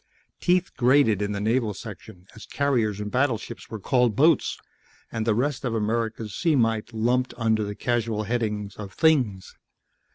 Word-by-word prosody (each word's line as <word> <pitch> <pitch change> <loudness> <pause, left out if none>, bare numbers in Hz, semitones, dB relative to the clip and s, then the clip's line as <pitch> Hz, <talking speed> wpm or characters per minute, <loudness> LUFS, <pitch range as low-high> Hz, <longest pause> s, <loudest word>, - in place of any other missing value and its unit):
Teeth 180 0 +1
grated 125 -5 +3
in 105 0 -1
the 100 - -3
Naval 110 0 0
section 90 0 -10
as 110 - -12
carriers 120 -8 0
and 105 0 -4
battleships 120 -3 -1
were 110 - -6
called 125 0 +2
"boats" 155 +4 +3 0.5
and 110 -1 -3
the 110 - +3
rest 135 +4 -1
of 120 -3 -1
America's 110 -1 -2
sea 165 - +1
might 115 -3 +1
lumped 120 +3 0
under 110 -2 +1
the 105 0 -5
casual 115 -1 -1
heading 105 -2 -2
of 100 -2 -8
"things." 125 -12 +1
115 Hz, 160 wpm, -25 LUFS, 105-125 Hz, 0.5 s, grated